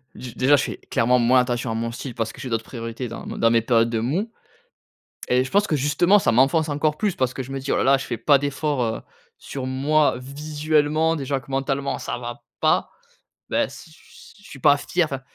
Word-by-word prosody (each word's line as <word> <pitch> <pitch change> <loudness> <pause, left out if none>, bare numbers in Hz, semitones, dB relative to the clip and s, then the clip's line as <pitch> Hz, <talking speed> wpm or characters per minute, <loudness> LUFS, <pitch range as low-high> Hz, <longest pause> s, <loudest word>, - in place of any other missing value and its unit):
d 125 -2 -8
déjà 135 +3 +4
je 140 - +1
fais - - -5
clairement 125 +2 +1
moins 125 +2 +4
attention 125 -1 -1
à - - -1
mon 115 +1 -2
style 125 0 -7
parce 115 -2 -3
que - - -11
j'ai 130 - -5
d'autres 115 0 -2
priorités 115 0 -6
dans 115 - -8
mes - - -6
dans 115 - +3
mes 115 -1 +4
périodes 115 0 +2
de 115 -1 -1
mou 175 - -1 1.0
et 125 +1 +3
je 130 - -8
pense 205 +1 +3
que 155 - 0
justement, 150 +8 +3
ça - - +1
m'enfonce 135 +7 +3
encore 150 +1 0
plus 205 -4 0
parce 130 -1 0
que 130 - -3
je 130 - -10
me 135 - -3
dis: 135 - -4
«Oh - - +2
là - - +1
là, 135 +1 +5
je 135 - -6
fais 120 - -4
pas 140 +5 +4
d'efforts, 145 -1 -1
heu, 110 -1 -2 0.4
sur 130 -2 -6
moi 145 +4 +2
visuellement 150 +3 0
déjà 140 -2 -2
que 135 +1 -14
mentalement, 135 +1 -1
ça - - -4
va 120 0 -7 0.2
pas». - - +2 0.6
Beh - - +1
s - - -8 0.5
je 205 - -21
suis 135 - -10
pas 145 +2 +5
fier, 175 +4 0
enfin, 135 -3 -5
135 Hz, 235 wpm, -23 LUFS, 120-150 Hz, 1.0 s, là